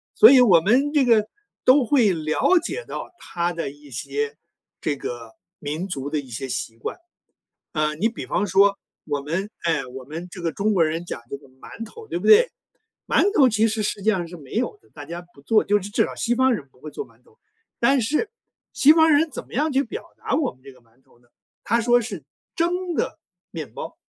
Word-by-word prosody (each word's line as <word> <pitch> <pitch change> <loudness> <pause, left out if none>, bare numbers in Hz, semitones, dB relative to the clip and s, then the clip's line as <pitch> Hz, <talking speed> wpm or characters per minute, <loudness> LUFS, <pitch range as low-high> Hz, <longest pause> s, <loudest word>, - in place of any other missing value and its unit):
所 440 - +9
以 270 - +8
我 190 -10 +6
们 260 - +2
这 290 -3 +4
个 220 -3 +4 0.4
都 260 0 +6
会 230 -5 +3
了 160 - +2
解 485 +7 -4
到 - - -7
它 175 0 -2
的 170 -4 -3
一 145 0 -15
些 140 +4 -3 0.4
这 150 - -1
个 120 -4 -7 0.3
民 155 +5 -4
族 140 -5 -4
的 150 - -1
一 135 -3 -9
些 125 +3 -5
习 115 -2 -4
惯， - - -5 0.8
啊， 155 -1 0
你 190 +9 +1
比 230 - -7
方 200 - 0
说 200 +2 +4 0.3
我 145 -2 -2
们 170 +8 -3
哎， 160 -5 0
我 130 +1 -9
们 160 +6 -7
这 180 - -9
个 165 - 0
中 210 +2 0
国 175 -4 +4
人 160 +2 -2
讲 170 - -6
这 - - -3
个 140 - -19
馒 130 +12 -10
头， 445 - -12
对 - - -2
不 - - -4
对？ 455 +3 +7 0.6
馒 405 +1 +2
头 265 - +7
其 220 0 +3
实 215 0 -1
实 205 0 -2
际 215 - -1
上 185 -5 -1
是 175 - -9
没 140 -4 -14
有 245 - -1
的， - - -27
大 145 - -10
家 170 +3 -6
不 140 - -18
做， 215 +8 +3
就 205 +1 +2
是 200 - -7
至 - - +2
少 - - -7
西 240 0 0
方 260 0 +4
人 150 -10 -6
不 125 - -27
会 155 - -8
做 430 - -6
馒 - - -25
头， 455 0 -27 0.4
但 270 +3 +4
是 300 - 0 0.4
西 290 - +6
方 320 0 +5
人 310 +2 +3
怎 260 - -7
么 - - -21
样 300 +4 +1
去 270 +1 +3
表 440 - -7
达 - - -3
我 290 -5 0
们 130 - -27
这 135 0 -12
个 130 - -21
馒 120 +2 -31
头 130 -3 -27
呢？ 120 0 -30 0.4
他 230 +2 +2
说 240 +1 +4
是 235 +1 -6 0.3
“蒸 350 +1 0
的 - - -2 0.3
面 150 -9 -7
包”。 - - -7
190 Hz, 245 characters per minute, -23 LUFS, -, 0.8 s, 所